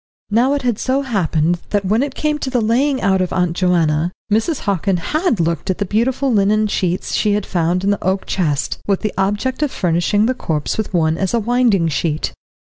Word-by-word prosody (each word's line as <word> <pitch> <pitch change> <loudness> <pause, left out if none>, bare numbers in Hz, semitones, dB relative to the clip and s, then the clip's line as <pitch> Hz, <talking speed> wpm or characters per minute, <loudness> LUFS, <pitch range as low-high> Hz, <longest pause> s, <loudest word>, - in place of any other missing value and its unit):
Now 250 +6 +3
it 285 - -3
had 240 -4 0
so 270 +2 0
happened 175 - 0
that 205 -1 0
when 215 +5 +2
it 275 -1 -3
came 300 -1 -1
to 270 - -3
the 250 -2 +1
laying 255 +5 +1
out 190 -2 +2
of 180 - -1
Aunt 180 -2 0
Joanna, 170 -3 +1 0.2
Mrs. 225 +8 +1
Hockin 195 -2 0
had 305 - 0
looked 170 +2 -1
at 185 - 0
the 205 - -1
beautiful 250 +6 0
linen 210 +1 +3
sheets 185 -3 -1
she 210 -2 +2
had 210 -1 -1
found 175 +1 0
in 200 - +2
the 205 - -2
oak 190 +1 0
chest, 150 -7 -1
with 195 -2 +1
the 215 - -2
object 205 +8 -1
of 300 - +1
furnishing 175 +4 +1
the 255 - +1
corpse 155 - -2
with 220 - -3
one 160 -2 +1
as 195 +3 0
a - - +2
winding 230 -6 +2
sheet. 155 0 -1
200 Hz, 215 wpm, -18 LUFS, 175-240 Hz, 0.2 s, Now